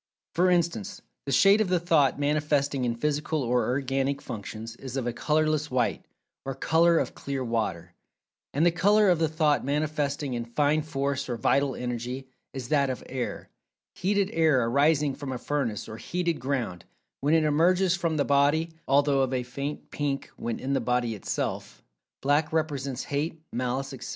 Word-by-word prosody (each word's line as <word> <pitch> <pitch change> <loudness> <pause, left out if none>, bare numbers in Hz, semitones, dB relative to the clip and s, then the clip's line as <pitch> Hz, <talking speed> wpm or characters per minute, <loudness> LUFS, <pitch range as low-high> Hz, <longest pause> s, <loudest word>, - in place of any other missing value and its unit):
For 180 +2 +3
instance 180 +3 0 0.2
the - - -1
shade 195 +11 +6
of 205 - 0
the 180 -1 +2
thought 160 -5 +3
manifesting 145 -2 +1
in 120 -1 0
physical 150 +3 -1
or 125 0 +1
organic 135 +1 0
functions, 110 0 -7
is 130 0 -6
of 130 - -2
a 120 - -1
colorless 155 +2 +1
white, 125 -2 0 0.4
or 135 -1 -4
"color 165 +4 +3
of - - -1
clear 140 -1 -4
water"; 95 -8 -2 0.6
and 150 +4 +2
the 175 - +5
color 200 +4 +4
of 175 - +2
the 160 - +3
thought 155 -2 +1
manifesting 145 -1 -1
in 120 -1 -2
Fine 145 +5 +1
Force 140 -3 -2
or 120 - -2
Vital 140 +4 +2
Energy, 125 +2 -4 0.2
is 130 -3 -6
that 140 -3 +3
of 130 - -4
air,—heated 190 +9 -3
air 155 -7 +3
arising 145 +3 +3
from 140 -1 -6
a 130 - -3
furnace 120 -6 -2
or 110 0 -7
heated 170 +6 -2
ground—when 130 - -3
it 160 - +4
emerges 175 +5 +3
from 170 -3 -1
the 145 - +2
body 145 +4 +2 0.2
although 140 0 +3
of 130 -1 0
a 130 -1 -1
faint 140 +4 -6
pink 140 -2 -2
when 115 - -4
in 135 +2 -2
the 135 - +1
body 125 -2 0
itself. 105 - -4 0.4
Black 145 +3 +2
represents 140 -5 -2
Hate, 150 +3 -2
Malice, 130 +3 -2
etc. 130 - -7
140 Hz, 170 wpm, -27 LUFS, 130-155 Hz, 0.6 s, shade